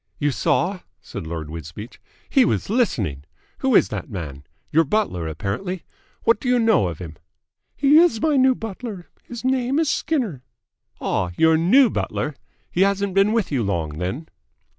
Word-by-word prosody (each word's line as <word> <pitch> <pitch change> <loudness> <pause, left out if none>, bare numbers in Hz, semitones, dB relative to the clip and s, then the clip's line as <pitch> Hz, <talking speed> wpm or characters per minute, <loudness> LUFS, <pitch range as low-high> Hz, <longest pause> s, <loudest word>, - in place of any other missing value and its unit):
"You 145 -1 +1
saw?" 180 +7 0 0.2
said 80 - -8
Lord 80 -2 -5
Wisbeach. 85 - -9 0.3
"He 265 - +4
was 220 - 0
listening. 110 - 0 0.4
Who 265 -3 +2
is - - +5
that - - -5
man? 75 - -7 0.3
Your 165 +2 +5
butler 145 - -1
apparently. 110 - -4 0.4
What 230 -2 +3
do 250 - -3
you 250 - +4
know 225 - +3
of 85 - -5
him?" 80 -4 -9 0.6
"He 290 +2 +5
is 335 -10 +4
my 305 +4 +2
new 260 -1 +4
butler. 220 -4 -7
His 240 +1 -9
name 260 +1 +1
is 320 -2 +2
Skinner." 235 - -1 0.6
"Ah, 90 - -1
your 160 0 +5
new 210 +10 +5
butler? 150 - -2 0.4
He 180 - 0
hasn't 200 0 +2
been 195 +2 +4
with 225 -7 0
you 135 -4 +1
long, 85 -7 -2
then?" 110 - -4
180 Hz, 165 wpm, -22 LUFS, -, 0.6 s, is